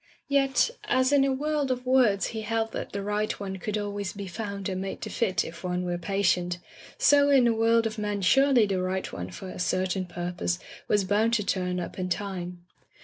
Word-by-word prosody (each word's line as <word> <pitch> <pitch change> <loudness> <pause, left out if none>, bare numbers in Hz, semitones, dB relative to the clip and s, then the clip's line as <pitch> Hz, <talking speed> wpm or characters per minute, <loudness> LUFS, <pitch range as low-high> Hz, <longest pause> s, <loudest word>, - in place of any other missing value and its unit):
Yet, 275 - +3
as 260 +2 +2
in 280 -1 +5
a 275 - +2
world 290 +1 0
of 250 0 -2
words 245 -7 +3
he 220 - -3
held 225 +1 -1
that - - -5
the 200 0 -4
right 210 +1 -1
one 190 -1 -4
could 210 +3 -3
always 205 -2 -3
be 200 -1 -6
found 200 0 -5
and 185 -1 -3
made 195 0 -4
to - - -5
fit 190 -7 0
if 165 +2 -9
one 180 0 -1
were 175 -1 -2
patient, 180 -1 +1 0.4
so 285 0 +5
in 270 -3 +5
a 235 - +4
world 225 +1 +3
of 220 0 -3
men 205 -1 -2
surely 270 +2 +5
the 195 -2 -1
right 185 +1 -2
one 90 +1 -5
for 140 - -8
a - - -8
certain 185 +1 0
pur 175 0 -4
pose 85 - -1 0.3
was 205 -1 +3
bound 210 +4 +2
to 210 - +1
turn 180 -2 -1
up 175 - -6
in 180 0 -2
time. 180 -2 -4
200 Hz, 215 wpm, -27 LUFS, 185-230 Hz, 0.4 s, in